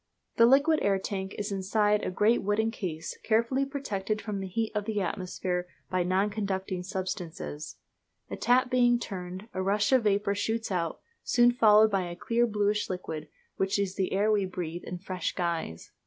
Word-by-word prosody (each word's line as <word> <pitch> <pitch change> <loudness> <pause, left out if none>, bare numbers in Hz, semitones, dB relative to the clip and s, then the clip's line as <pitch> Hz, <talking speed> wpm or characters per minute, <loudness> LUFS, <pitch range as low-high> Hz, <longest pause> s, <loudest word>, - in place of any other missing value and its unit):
The 230 - +7
liquid 285 +5 +5
air 200 -1 +2
tank 190 0 -4
is 205 0 -3
inside 205 +2 +1
a - - -1
great 210 +6 +2
wooden 215 +3 +1
case, 165 -7 -5
carefully 235 +5 +2
protected 215 -7 -3
from 210 -3 -4
the 190 - -4
heat 220 +4 -2
of 210 -1 -2
the 215 -1 -1
atmosphere 180 -1 -2 0.2
by 185 -1 +1
non 190 +4 +1
conducting 190 -3 -2
substances. 180 -5 -5 0.5
A - - -5
tap 250 +1 +2
being 245 -1 +4
turned, 185 -2 -6
a 185 - -2
rush 205 +3 +1
of 255 -4 +4
vapour 200 0 +2
shoots 220 +2 -2
out, 170 -3 -2 0.2
soon 240 0 +4
followed 220 -2 +6
by 190 -3 0
a 175 - -6
clear, 235 +6 +1
bluish 210 -1 0
liquid, 170 -4 -5 0.3
which 195 +1 +1
is 200 -2 -1
the 190 -1 -1
air 205 +3 +2
we 210 -2 +2
breathe 175 -2 -5
in 180 - -5
a - - -5
fresh 185 0 -3
guise. 165 - -3
200 Hz, 185 wpm, -28 LUFS, 185-220 Hz, 0.5 s, The